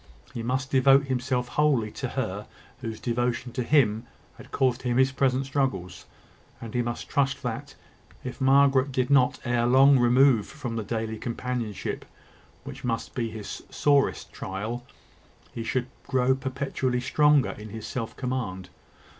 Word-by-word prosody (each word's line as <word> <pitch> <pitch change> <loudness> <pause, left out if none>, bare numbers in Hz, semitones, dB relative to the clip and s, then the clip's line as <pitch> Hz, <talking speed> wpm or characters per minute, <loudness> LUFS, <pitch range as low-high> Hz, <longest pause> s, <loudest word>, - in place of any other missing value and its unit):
He 115 - -4
must 130 +3 -2
devote 135 +1 +5
himself 125 -1 -1
wholly 135 -8 +2
to - - -4
her - - -3 0.3
whose 115 -3 -5
devotion 120 0 -1
to 125 - -3
him 120 -4 +2 0.3
had - - -14
caused 130 -2 +1
him 120 -1 0
his 130 0 +4
present 135 0 +1
struggles; 100 -11 -2 0.5
and 115 -2 -8
he 125 - +1
must 120 0 -4
trust 140 0 0
that, 115 -3 -5 0.5
if 130 +1 -7
Margaret 135 0 +4
did 130 +1 0
not 130 -3 +4
ere 120 -1 +1
long 135 +2 +6
remove 120 -2 +4
from 130 -7 -6
the 115 - -1
daily 110 +1 -3
companionship 120 -3 -4 0.6
which 135 +1 -9
must 115 -2 -2
be 115 -2 -2
his 110 -2 -7
sorest 145 -2 +1
trial, 110 +6 -5 0.7
he 115 - -4
should 125 +2 -1 0.2
grow 130 -1 +3
perpetually 130 -1 -2
stronger 150 +2 +3
in 105 0 -9
his 110 0 -7
self 115 -3 -5
command. 115 -8 -3
125 Hz, 150 wpm, -26 LUFS, 115-135 Hz, 0.7 s, long